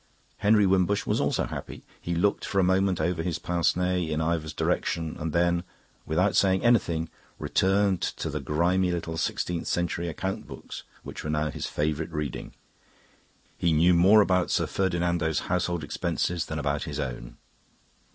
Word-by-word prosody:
Henry 105 0 +4
Wimbush 95 +1 +2
was - - +1
also - - +1
happy. - - -7 0.2
He 85 - -2
looked 100 +4 +1
for 100 - -3
a 95 - +5
moment 95 0 +2
over 85 +2 0
his 85 -1 -2
pince 85 -1 +1
nez 90 -2 0
in 75 0 -1
Ivor's 80 -1 -1
direction 80 +1 -1
and 80 0 -3
then, 85 +1 +2 0.4
without 90 +6 +2
saying 95 -1 +3
anything, 85 -9 +2 0.3
returned 95 -1 +1
to - - -3
the - - -3
grimy 90 +4 +1
little 85 -1 -3
sixteenth 85 +1 -2
century 85 0 -1
account 95 +4 -4
books - - -8 0.2
which - - -8
were 75 - -4
now 75 0 0
his - - -4
favourite 75 +2 -2
reading. 75 -4 -5 1.0
He 85 - +2
knew 85 +4 +5
more 95 +5 +6
about 90 -3 +2
Sir - - +1
Ferdinando's 85 -3 0
household 90 -2 -1
expenses 85 +3 -2
than 80 - -4
about 75 0 -1
his 75 -2 -5
own. - - -5
85 Hz, 160 wpm, -27 LUFS, 80-95 Hz, 1.0 s, more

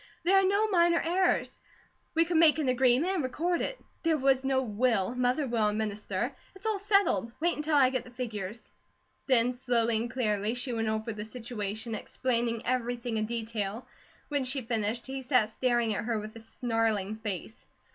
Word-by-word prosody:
There 365 +4 +4
are - - +2
no 405 +3 +2
minor 345 -4 +4
heirs. 360 +3 +1 0.6
We 330 +1 +4
could 340 -1 0
make 320 -1 +6
an 305 -4 -1
agreement 255 +8 +3
and 370 - 0
record 335 +7 -1
it. - - -3 0.2
There 325 -2 +2
was 265 -1 +2
no 265 0 +2
will. 225 -2 +1
Mother 250 +4 +1
will 230 -4 +1
administer. 210 +2 -2 0.2
It's 385 - -12
all 435 -2 0
settled. 395 - +2
Wait 345 +2 +1
until 300 0 0
I 260 -3 +5
get 255 - -1
the - - -13
figures." 225 -4 -6 0.6
Then 250 -2 +4
slowly 235 -2 +1
and 235 +2 -2
clearly 215 -2 0
she 250 0 -2
went 225 -1 -1
over 220 +1 -2
the 210 0 -6
situation, 220 -1 -5
explaining 235 +1 -1
everything 245 -2 -1
in 215 0 -1
detail. 225 -1 -3 0.4
When 285 -2 0
she 260 +1 -1
finished 225 0 -1
he 265 0 -5
sat 250 -4 +2
staring 240 -2 +1
at 205 - -3
her 230 -2 0
with 215 +1 -8
a - - -8
snarling 225 -3 -1
face. 215 0 -6
245 Hz, 180 wpm, -29 LUFS, 220-275 Hz, 0.6 s, make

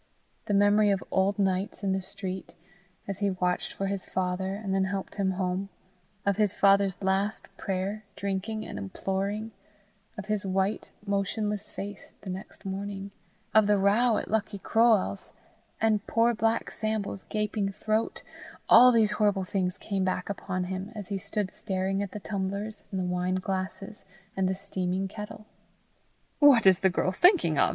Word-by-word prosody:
The 205 - +1
memory 205 +1 +5
of 195 -2 +1
old 195 +2 +2
nights 195 0 0
in 195 - +1
the 190 0 0
street, 190 -1 -6 0.5
as 195 -2 -4
he 200 -1 +2
watched 180 -1 -1
for 195 - -3
his 195 -1 -2
father, 190 +1 -2
and 200 -2 -3
then 195 0 +2
helped 195 0 -4
him 195 -2 0
home; 185 +1 -2 0.6
of 200 -1 +2
his 210 -3 +2
father's 195 -1 +4
last 195 +1 -1
prayer, 195 +3 -3
drinking 200 +2 -3
and - - -6
imploring; 195 - -3 0.7
of 205 - -5
his 210 -1 -1
white, 195 +2 -1 0.2
motionless 205 +1 -1
face 205 -1 -8
the 190 - -5
next 190 +2 -9
morning; 195 0 -4 0.4
of 220 -1 +6
the 210 0 +4
row 210 +4 +4
at - - -3
Lucky 215 -1 0
Croale's, 220 -1 +2 0.5
and 215 -2 +1
poor 230 +1 +3
black 225 +1 0
Sambo's 215 -3 -2
gaping 210 -1 -1
throat 215 +3 -1 0.4
all 250 +1 +9
these 220 -3 +3
terrible 205 -2 +3
things 185 -1 -1
came 195 -2 -2
back 185 +1 -1
upon 185 -2 -3
him, 190 +3 -4
as 205 -3 -6
he 200 -1 -2
stood 200 0 -2
staring 190 +1 -2
at 200 - -3
the 210 - -7
tumblers 200 +2 -4
and 190 - -3
the 185 - -1
wine 180 +1 0
glasses 190 +2 -4 0.3
and 190 -1 +1
the 190 - 0
steaming 190 -1 -2
kettle. 210 +1 -8 0.9
"What 275 -7 +7
is 190 -1 +7
the 190 - +4
girl 185 0 0
thinking 245 - +4
of!" - - +5
195 Hz, 165 wpm, -28 LUFS, 190-210 Hz, 0.9 s, all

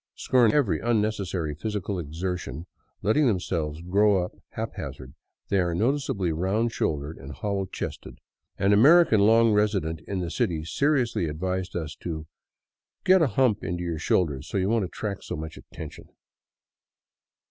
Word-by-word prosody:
Scorn 125 -2 +3
ing - - +1
every 105 - +2
unnecessary 105 -8 0
physical 100 +2 -3
exertion, 85 -1 -4 0.4
letting 130 +8 +3
themselves 85 -7 -1
grow 100 +1 +3
up 90 - -5 0.2
haphazard, 65 -1 -6 0.4
they 100 - +2
are 85 -2 0
noticeably 110 - 0
round 95 +8 0
shouldered 75 -6 -2
and 70 - -9
hollow 100 -2 -2
chested. - - -6 0.4
An 100 +1 +3
American 140 +2 +6
long 115 +2 +5
resident 100 -7 +1
in 95 - -2
the 85 -3 -3
city 80 -1 -1
seriously 125 - +1
advised 90 +4 -3
us 80 -3 -4
to 80 -3 -5 0.4
" - - -63
get 185 -1 +6
a 160 - +4
hump 115 -2 +2
into 90 -1 -3
your 85 -2 -3
shoulders 75 -5 0
so - - -2
you 95 +1 +1
won't 115 -3 +2
attract 100 +2 -5
so - - -4
much 80 +1 -6
attention." - - -10
95 Hz, 150 wpm, -26 LUFS, 80-110 Hz, 0.4 s, American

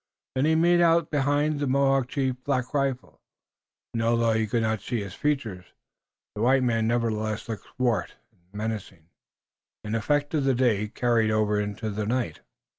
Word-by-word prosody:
Then 130 +2 +1
he 160 +1 +3
made 175 +2 +4
out 165 -1 +3
behind 145 +1 +1
the 145 - -1
Mohawk 135 -1 +2
chief, 130 -2 -2
Black 130 -2 -1
Rifle, 135 -3 -2 0.7
and, 115 - -1
although 115 0 +2
he 110 0 +1
could 115 +1 0
not 110 -2 0
see 120 +2 -2
his 100 -2 -8
features, 115 -12 -2 0.7
the 105 - -5
white 130 +2 +4
man 115 -2 +1
nevertheless 110 -2 -1
looked 110 -3 -6
swart 125 -3 0 0.2
and - - -35
menacing, 105 -6 -5 0.7
an 105 - -4
effect 145 +7 0
of 150 -3 +1
the 135 -2 +3
day 115 -5 +2
carried 115 0 +1
over 105 -1 +1
into 105 +1 -3
the 105 +1 -3
night. 120 -9 -1
120 Hz, 170 wpm, -26 LUFS, 110-135 Hz, 0.7 s, made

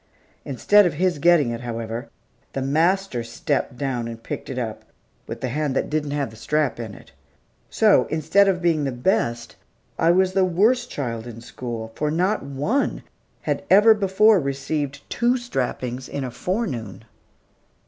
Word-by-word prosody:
Instead 200 +9 +4
of 160 - -3
his 175 -1 0
getting 160 -6 +4
it, 115 0 -5
however, 115 +1 -5 0.4
the 135 - -2
master 160 -1 +1
stepped 115 +1 -2
down 125 -3 -2
and 115 0 -8
picked - - -6
it 130 - -5
up, 115 -4 -4 0.4
with - - -6
the 130 - -2
hand 145 +1 -1
that - - -1
didn't 150 -1 -1
have 140 -4 -2
the - - -13
strap 145 +3 -1
in 110 -3 -6
it. - - -16 0.6
So, - - +4
instead 160 +6 +3
of 180 -2 0
being 165 -3 +2
the 135 - -1
best, 120 - -1 0.4
I 165 - +3
was 185 +1 +3
the 190 0 +3
worst 220 +8 +2
child 115 -4 -4
in 115 -1 -8
school, 120 -2 -6
for 150 +4 -1
not 180 +7 +1
one 145 - -1 0.4
had - - -1
ever 210 +4 +7
before 205 +1 +4
received 140 0 -3
two 240 +2 +1
strappings 130 - -3
in 140 - -4
a 125 - -4
forenoon. 125 - -3
145 Hz, 165 wpm, -23 LUFS, 120-185 Hz, 0.6 s, ever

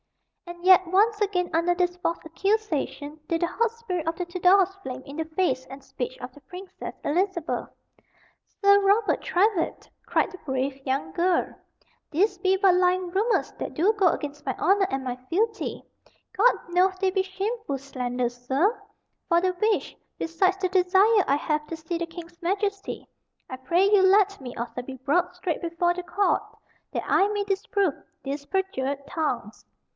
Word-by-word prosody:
And 345 0 -9
yet, 370 0 +7
once 420 +4 +3
again, 365 -4 +1
under 335 +2 +2
this 355 0 0
false 340 -2 -1
accusation, 320 -5 -2
did 330 -1 -1
the 345 - +2
hot 460 +5 0
spirit 385 -9 -4
of 330 - 0
the 360 - -3
Tudors 365 +2 +3
flame 260 -5 -6
in 280 - -9
the 320 - -1
face 315 -5 -1
and 270 +1 -10
speech 260 -2 -5
of 250 0 -8
the 290 - -16
Princess 360 +7 -9
Elizabeth. 345 +1 -1 0.9
"Sir 400 0 +6
Robert 405 +2 +2
Trywhitt," 370 -1 0 0.2
cried - - +1
the 370 - -11
brave 270 -1 -3
young 270 0 -2
girl, 355 0 +1 0.6
"these 375 +8 +1
be 380 -1 +2
but 380 -2 +5
lying 360 0 +2
rumors 425 +6 +1
that - - -5
do 380 +8 +3
go 400 -4 +3
against 295 -1 -4
my - - -1
honor 390 0 +3
and 270 0 -2
my 250 -1 -3
fealty. 435 +5 -1 0.5
God - - +5 0.2
knoweth 370 +2 +2
they 380 -1 +2
be 385 0 +1
shameful 390 - -3
slanders, 250 -2 -3
sir; 380 - +1 0.5
for 340 -1 +5
the 370 +1 +1
which, 425 +4 0 0.2
besides 370 +4 +1
the 380 -1 0
desire 380 +3 +4
I 275 - +3
have 300 0 -1
to 330 - -5
see 320 +2 -4
the 340 - -2
King's 340 0 -11
Majesty, 400 +3 -2 0.4
I 260 - -4
pray 335 +9 +2
you 405 -1 +5
let 395 -1 +4
me 250 -2 -7
also 240 +1 -4
be 260 +2 -8
brought 335 +8 0
straight 360 -2 -3
before 345 0 0
the 360 0 -6
court 405 +3 +1 0.5
that - - -2
I 390 - +3
may 410 -1 -1
disprove 395 -3 0 0.3
these 280 +1 -4
perjured 280 -8 -2
tongues." 290 - -3
360 Hz, 170 wpm, -26 LUFS, 295-390 Hz, 0.9 s, yet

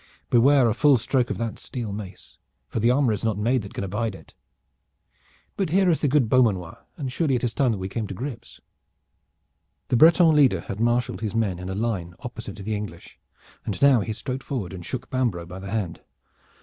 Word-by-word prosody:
Beware 130 +1 +5
a 110 - +2
full 140 +2 +4
stroke 125 +1 0
of - - -2
that 115 -1 -4
steel 115 -5 -5
mace, 100 -2 -9 0.3
for - - -3
the 115 +2 +3
armor 125 -2 +3
is 105 - -4
not 110 -3 0
made 120 +4 +1
that 100 - -10
can - - -3
abide 105 +2 -2
it. - - -15 1.2
But 195 -5 -1
here 185 +1 +3
is 160 - 0
the 150 - +2
good 140 -3 +3
Beaumanoir, 105 -9 +1
and 135 -5 -4
surely 140 -1 +1
it 120 - -2
is 120 -2 0
time 130 -2 +2
that - - -3
we 95 0 -4
came 110 +2 -4
to 95 - -6
grips." 120 +1 -7 1.3
The 120 - +3
Breton 165 +2 +6
leader 130 - +4
had 100 +4 -7
marshaled 120 +1 0
his 110 -1 -3
men 100 -6 0
in 90 +1 -6
a 95 - -3
line 100 -6 -2
opposite 115 -2 -7
to 105 - -9
the 110 +2 -2
English, 105 -5 -8 0.4
and - - -4
now 140 -3 +6
he 110 - -3
strode 130 +4 -4
forward 110 -11 -4
and 90 -2 -8
shook 130 +7 -5
Bambro' 120 -10 -1
by 90 +2 -9
the 95 +1 -7
hand. 95 -6 -3
115 Hz, 215 wpm, -24 LUFS, 100-130 Hz, 1.3 s, Breton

